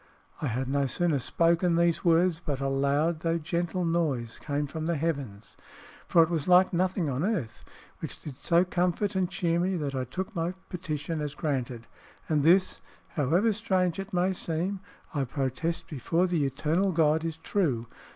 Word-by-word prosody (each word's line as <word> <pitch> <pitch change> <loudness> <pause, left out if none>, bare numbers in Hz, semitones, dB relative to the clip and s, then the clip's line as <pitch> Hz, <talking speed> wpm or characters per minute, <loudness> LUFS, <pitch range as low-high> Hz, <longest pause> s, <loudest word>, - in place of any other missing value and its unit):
I 150 - 0
had 125 +2 -2
no 140 +1 +1
sooner 155 +2 +1
spoken 170 +5 +2
these 170 0 +2
words, 170 0 +3
but 140 -3 -2
a 135 0 -1
loud 140 +4 +1
though 165 0 0
gentle 170 +2 -2
noise 150 -9 -1
came 145 0 -2
from 155 +3 -4
the 170 - +1
heavens 140 -10 -3 0.5
(for 165 - +6
it 160 - -1
was 160 -2 -1
like 180 +1 +6
nothing 180 -1 +1
on 135 +2 -1
earth), 180 - -2 0.4
which - - -6
did 140 -4 -9
so 170 +1 +3
comfort 180 +3 0
and 185 -2 +1
cheer 170 -2 0
me 185 +1 0
that 145 -4 -3
I 130 -1 -2
took 190 - -5
my 170 +2 -1
petition 160 -3 -3
as 150 -1 -4
granted. 125 -6 -2 0.4
And 155 -2 +2
this 180 +5 +4 0.3
(however 170 - +2
strange 190 -5 0
it 195 +2 -5
may 185 +1 +1
seem) 180 +3 -2 0.3
I 145 -3 0
protest 135 +5 -2
before 165 +5 0
the 170 -5 +1
eternal 160 +8 +1
God 160 -1 +3
is 165 -1 -3
true. 150 - 0
165 Hz, 175 wpm, -28 LUFS, 140-180 Hz, 0.5 s, for